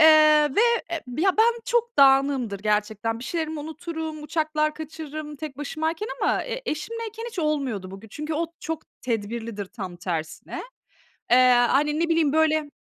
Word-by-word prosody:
Eee, 315 - +9 0.5
ve, - - +6 0.3
eee, 335 -1 -2 0.2
ben 440 +7 +3
çok 475 -1 +1
dağınığımdır 270 -6 +4
gerçekten. 215 +2 0
Bir 240 - -8
şeylerimi 315 +1 -2
unuturum, 315 0 -5
uçaklar 305 0 0
kaçırırım 310 -1 -7
tek 285 -2 -7
başımayken 320 +7 -2
ama - - +2
e - - -4
eşimleyken 450 +7 -5
hiç 445 - -10
olmuyordu 275 - -1
bugü 195 +3 -10
Çünkü 300 +7 -4
o 330 +2 0
çok 320 0 -4 0.2
tedbirlidir 225 -2 -3
tam 190 -3 -7
tersine. 165 -3 -4 0.7
Eee, 245 - +8 0.3
hani, 295 +3 +2
ne 335 0 +1
bileyim, 325 -3 +3
böyle, 315 -1 +2
305 Hz, 145 wpm, -25 LUFS, 235-320 Hz, 0.7 s, Eee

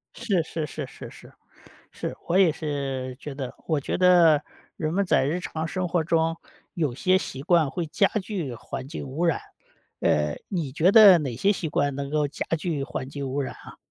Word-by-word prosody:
是 200 -8 0
是 160 -1 -4
是 - - -6
是 - - -10
是， - - -15 0.6
是。 - - -5
我 175 - +2
也 190 -4 +5
是 135 -4 -4
觉 145 0 -7
得 135 -2 -6
我 155 -3 +1
觉 - - -3
得， 175 -5 +5 0.3
人 155 -1 -2
们 200 +2 +2
在 155 - +3
日 160 +6 -1
常 160 -2 -4
生 185 +1 -2
活 170 -1 +1
中， 165 0 +1 0.4
有 155 -7 0
些 185 +9 +3
习 135 -7 -6
惯 165 -1 +3
会 175 -3 -3
加 180 +6 +3
剧 185 - -4
环 130 +3 -7
境 145 -1 -6
污 150 +7 -2
染。 165 -4 +1 0.6
呃， 75 -1 +1
你 165 -8 -3
觉 160 +6 +4
得 205 -5 +9
哪 130 -7 -4
些 200 +11 +3
习 175 -5 -3
惯 145 -1 0
能 140 0 -4
够 150 -1 +1
加 140 - -5
剧 155 -3 -2
环 130 - -5
境 140 -1 -5
污 140 +2 -1
染 130 - -5
啊？ - - -13
155 Hz, 215 characters per minute, -25 LUFS, 140-175 Hz, 0.6 s, 得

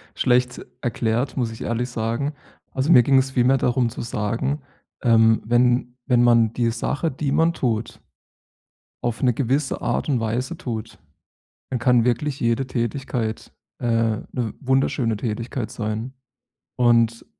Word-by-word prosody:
schlecht 125 0 +1 0.2
erklärt, 120 +2 -1
muss 120 -3 0
ich 115 - -10
ehrlich 120 +2 -2
sagen. 115 +5 -2 0.4
Also, 135 +4 0
mir 125 -7 +8
ging 135 +2 +4
es 130 0 +2
vielmehr 130 +1 +3
darum 125 -1 +1
zu - - -7
sagen, 115 +6 -2 0.4
ähm, 115 -2 +4
wenn 120 +1 +2
wenn 125 -3 +3
man 115 -2 +4
die 120 -1 +1
Sache, 145 +7 -2
die 135 +1 -2
man 165 +3 +3
tut, 115 -7 -2 1.0
auf 120 -1 -2
'ne 125 -1 +4
gewisse 135 +3 -1
Art - - -1
und 130 -4 +2
Weise 120 +9 -2
tut, 115 -5 -6 0.7
dann 125 - -2
kann 125 -2 +3
wirklich 130 +4 0
jede 115 +3 0
Tätigkeit, 120 -2 -3 0.3
äh, 120 - -2
'ne 115 0 -1
wunderschöne 130 -4 +1
Tätigkeit 115 +2 -4
sein. 110 +3 -4 0.6
Und 115 -1 +3
120 Hz, 140 wpm, -22 LUFS, 115-130 Hz, 1.0 s, mir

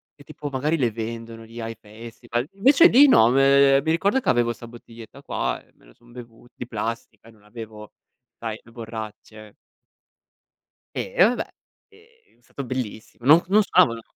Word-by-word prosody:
che 145 - -17
tipo 150 0 -8
magari 150 +5 -1
le 125 -6 0
vendono 115 +1 -7
lì 115 +1 -12
ai 115 0 -5
festival; 115 +3 -7
invece 275 - +5
lì 285 -1 +6
no, 120 - +5
ehm, 135 0 +5
mi 160 - -2
ricordo 200 +10 +1
che - - -2
avevo 120 -1 +2
sta 115 +1 -12
bottiglietta 115 -1 -14
qua - - -3
e - - -30
me - - -26
lo - - -20
son 120 0 -22
bevu 120 -1 -13
di 125 - -8
plastica 115 0 -6
e - - -16
non 110 - -24
avevo, 105 0 -11 0.4
sai, 110 -1 -6
le 115 - -20
borracce. 110 -2 -10 1.4
Eh, - - -5
e 180 - +7
vabbè. 240 +4 +2 0.4
È 425 - -24 0.4
è - - -34
stato 140 +3 -9
bellissimo. 120 -2 -7
No 155 +5 +6
non 210 +3 +4
stavano 115 - +2
120 Hz, 180 wpm, -23 LUFS, 115-140 Hz, 1.4 s, e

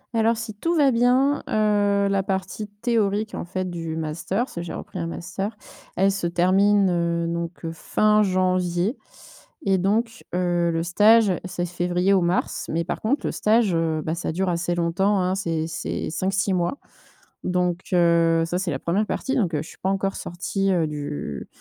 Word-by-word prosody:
Alors, 225 0 +3
si 225 -2 -5
tout 335 +12 -1
va 285 -4 +4
bien, 255 +4 +3
heu, 205 -2 +2
la 200 -1 +1
partie 190 +2 -3
théorique, 210 0 -1
en - - -4
fait, 185 +1 -3
du 165 -2 -4
master, 165 +8 -2
parce - - -15
que 170 - -3
j'ai 170 -2 -6
repris 185 - -7
un 165 - -2
master, 190 +5 -5 0.4
elle 195 +2 +3
se 195 -3 -2
termine, 190 +3 +3
heu, 170 -1 0
donc 170 0 -2 0.2
fin 210 +5 +2
janvier 185 +1 +1 0.7
et 190 -1 +3
donc 225 +5 0
heu, 175 -1 +1
le 165 0 -1
stage, 210 +4 +5
c'est 180 -1 -3
février 180 +2 +1
ou 190 - +4
mars. 175 +1 -1
Mais 165 +1 0
par 165 - -4
contre 265 +7 0
le - - -1
stage, 215 -3 +2
heu, 160 -1 0
bah 160 - -2
ça 170 - -3
dure 185 +2 0
assez 175 0 -1
longtemps, 175 +4 +1
hein. 185 +1 0
C'est 165 -4 -2
c'est 165 - -4
5-6 190 +3 0
mois 175 +8 0 0.7
donc, 180 0 0
heu, 170 -1 +4
ça, 175 +2 -2
c'est 185 -2 -2
la 135 - -3
1re 195 +6 0
partie 265 +4 -2
donc 195 -10 +1
je - - 0
suis - - -13
pas 190 - -1
encore 195 0 -1
sortie, 195 +3 -2
heu, 165 -3 +1
du 145 - -5
185 Hz, 185 wpm, -24 LUFS, 170-205 Hz, 0.7 s, stage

